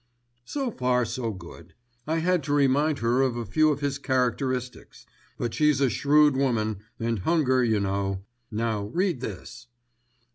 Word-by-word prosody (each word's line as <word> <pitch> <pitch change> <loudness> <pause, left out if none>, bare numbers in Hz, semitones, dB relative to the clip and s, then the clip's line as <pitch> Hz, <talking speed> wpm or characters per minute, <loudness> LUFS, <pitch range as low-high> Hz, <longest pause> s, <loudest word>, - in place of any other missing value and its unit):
"So 275 -4 -3
far 125 - +1
so 115 0 -3
good. 85 -3 -12 0.3
I 160 +1 0
had 175 +1 +1
to 145 - -1
remind 145 +2 +3
her 120 +3 +3
of 130 -3 +1
a 120 - -3
few 155 +10 +3
of 145 0 -3
his 140 -1 -1
characteristics; 130 -1 -2 0.3
but 120 -1 -3
she's 150 -3 +3
a 135 -3 +2
shrewd 145 +4 +4
woman, 115 -6 0 0.2
and 115 -2 -1
hunger 130 - +2
you 110 -3 +2
know. 100 -1 -2 0.2
Now 110 -2 -2
read 170 - -1
this." 125 +3 -8
125 Hz, 155 wpm, -26 LUFS, 115-145 Hz, 0.3 s, shrewd